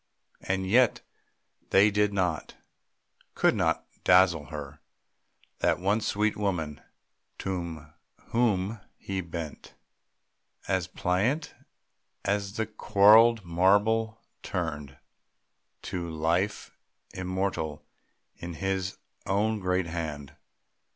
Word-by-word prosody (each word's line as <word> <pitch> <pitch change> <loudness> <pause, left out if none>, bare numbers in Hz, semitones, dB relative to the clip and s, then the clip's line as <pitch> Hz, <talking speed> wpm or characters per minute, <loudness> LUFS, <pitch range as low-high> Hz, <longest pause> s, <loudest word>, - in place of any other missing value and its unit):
And 95 0 -2
yet 120 +4 +4 0.7
they 100 +2 +5
did 105 0 +2
not, 90 -5 -1 0.8
could - - +3
not - - 0 0.2
dazzle 90 -4 +5
her 75 -2 -8 0.8
That - - +2
one 100 +5 +1
sweet 105 +1 0
woman 80 -9 -2 0.6
unto 85 -5 -4 0.5
whom 110 -3 +1 0.2
he 95 -1 -4
bent 85 -3 -7 0.9
As 95 -3 0
pliant 100 - -1 0.7
as 100 -1 -1
the 110 0 -1
quarried 110 +1 +5
marble 105 +6 +2 0.2
turned 75 -7 -4 0.9
To 85 -2 -4
life 85 +5 -1 0.4
immortal 90 -5 -3 0.5
in 85 -1 -7
his 95 +1 -2 0.3
own 105 +3 +1
great 90 -1 0
hand. 80 -4 -5
95 Hz, 90 wpm, -28 LUFS, 85-105 Hz, 0.9 s, they